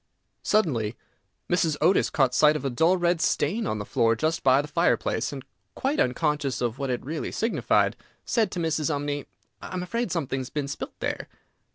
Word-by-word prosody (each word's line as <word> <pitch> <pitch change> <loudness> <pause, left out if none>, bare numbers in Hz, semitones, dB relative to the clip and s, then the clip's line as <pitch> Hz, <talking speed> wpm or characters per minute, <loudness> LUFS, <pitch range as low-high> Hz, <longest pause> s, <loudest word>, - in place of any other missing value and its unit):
Suddenly 125 - +1 0.5
Mrs. 165 -4 +1
Otis 175 +5 +3
caught 135 -4 +2
sight 150 +4 +5
of 150 - -4
a 135 - 0
dull 165 +9 +3
red 175 -1 +1
stain 200 +11 +1
on 110 - -1
the 105 - -5
floor 115 +2 +2
just 155 +8 -1
by 130 0 +5
the 145 - -2
fireplace, 170 +3 +1
and, 135 -2 -7 0.3
quite 275 +3 -1
unconscious 140 0 0
of 120 +1 -2
what 135 -1 -2
it 125 -1 -2
really 155 +3 -3
signified, 225 +2 +1 0.3
said 225 -4 +1
to 180 - -5
Mrs. 160 -2 0
Umney, 145 -1 -2 0.3
"I - - -7
am 180 - -2
afraid 230 +2 -2
something 140 -6 -1
has 130 0 -5
been 145 -2 -3
spilt 140 - -6
there." - - -3
150 Hz, 190 wpm, -26 LUFS, 130-175 Hz, 0.5 s, sight